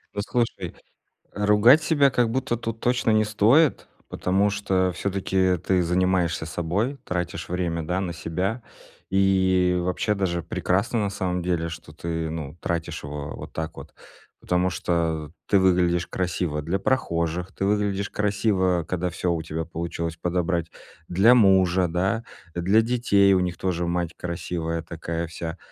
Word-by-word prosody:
Ну, 100 Hz, -, -2 dB
слушай, 120 Hz, -2 st, 0 dB, 0.7 s
э, 105 Hz, -, -3 dB
ругать 110 Hz, +9 st, +6 dB
себя 145 Hz, -3 st, +3 dB
как 120 Hz, -2 st, +1 dB
будто 130 Hz, 0 st, -1 dB
тут 115 Hz, -1 st, -5 dB
точно 120 Hz, -2 st, +1 dB
не 110 Hz, 0 st, +4 dB
стоит, 115 Hz, +9 st, +3 dB, 0.2 s
потому 100 Hz, +3 st, +1 dB
что 95 Hz, -2 st, 0 dB
всё-таки 95 Hz, -1 st, 0 dB
ты 90 Hz, +2 st, +1 dB
занимаешься 90 Hz, -2 st, +1 dB
собой, 90 Hz, -, -2 dB
тратишь 90 Hz, -2 st, -3 dB
время, 85 Hz, -2 st, -2 dB
да, 90 Hz, +4 st, -1 dB
на 90 Hz, -3 st, -3 dB
себя. 90 Hz, +8 st, -3 dB, 0.5 s
И 95 Hz, -2 st, +3 dB
вообще 90 Hz, +4 st, 0 dB
даже 90 Hz, -4 st, -1 dB
прекрасно 100 Hz, +9 st, 0 dB
на 100 Hz, -1 st, 0 dB
самом 90 Hz, -2 st, -2 dB
деле, 85 Hz, -2 st, -1 dB
что 80 Hz, -2 st, -9 dB
ты, 80 Hz, 0 st, -3 dB
ну, 80 Hz, -1 st, -6 dB
тратишь 85 Hz, -1 st, -3 dB
его 75 Hz, 0 st, -6 dB
вот -, -, -9 dB
так 80 Hz, 0 st, -5 dB
вот, -, -, -10 dB, 0.5 s
потому 90 Hz, +1 st, +1 dB
что 80 Hz, -3 st, -1 dB, 0.2 s
ты 100 Hz, -, +5 dB
выглядишь 90 Hz, -2 st, +2 dB
красиво 85 Hz, -4 st, -2 dB
для 85 Hz, +5 st, -1 dB
прохожих, 85 Hz, -6 st, -1 dB
ты -, -, -3 dB
выглядишь 100 Hz, -1 st, 0 dB
красиво, 100 Hz, -4 st, +1 dB
когда 90 Hz, 0 st, -1 dB
всё 85 Hz, +1 st, -1 dB
у 80 Hz, -1 st, -2 dB
тебя 80 Hz, +1 st, -4 dB
получилось 85 Hz, 0 st, -4 dB
подобрать, 85 Hz, -1 st, -1 dB, 0.4 s
для 100 Hz, +8 st, +5 dB
мужа, 95 Hz, -4 st, +4 dB
да, 95 Hz, +7 st, 0 dB, 0.3 s
э, 85 Hz, -, -2 dB
для 95 Hz, +6 st, +4 dB
детей- 110 Hz, -5 st, +3 dB
у 90 Hz, -, +3 dB
них 90 Hz, -1 st, -2 dB
тоже 90 Hz, -2 st, -1 dB
мать 85 Hz, 0 st, -2 dB
красивая 85 Hz, -1 st, -3 dB
такая 85 Hz, 0 st, -4 dB
вся. 85 Hz, +1 st, -6 dB
90 Hz, 155 wpm, -24 LUFS, 85-100 Hz, 0.7 s, ругать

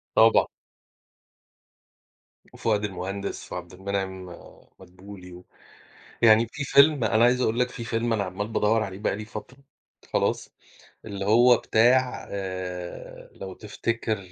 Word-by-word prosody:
طبعًا. 115 Hz, 0 st, +6 dB, 2.1 s
وفؤاد 105 Hz, -2 st, 0 dB
المهندس 95 Hz, +1 st, -5 dB
وعبد 90 Hz, 0 st, -7 dB
المنعم 95 Hz, 0 st, -4 dB, 0.5 s
مدبولي، 90 Hz, 0 st, -13 dB
و 90 Hz, +1 st, -13 dB, 0.8 s
يعني 115 Hz, 0 st, +6 dB
في 145 Hz, -, -4 dB
فيلم، 140 Hz, -1 st, +5 dB
أنا 110 Hz, +1 st, +3 dB
عايز 125 Hz, +1 st, +3 dB
أقول 115 Hz, -2 st, 0 dB
لك 125 Hz, -, +2 dB
في 115 Hz, -, -7 dB
فيلم 115 Hz, +1 st, -1 dB
أنا 105 Hz, -3 st, 0 dB
عمّال 95 Hz, +3 st, -4 dB
بادوَّر 110 Hz, 0 st, +1 dB
عليه 95 Hz, -3 st, -6 dB
بقى 100 Hz, -, -1 dB
لي 105 Hz, -, -6 dB
فترة، 110 Hz, +4 st, -9 dB, 0.5 s
خلاص، -, -, 0 dB, 0.6 s
اللي 100 Hz, -2 st, -5 dB
هو 120 Hz, +4 st, +6 dB
بتاع 125 Hz, +3 st, +2 dB
آآ 95 Hz, -2 st, -6 dB
لو 95 Hz, -1 st, -8 dB
تفتكر 110 Hz, +1 st, -3 dB
105 Hz, 125 wpm, -25 LUFS, 95-115 Hz, 2.1 s, طبعًا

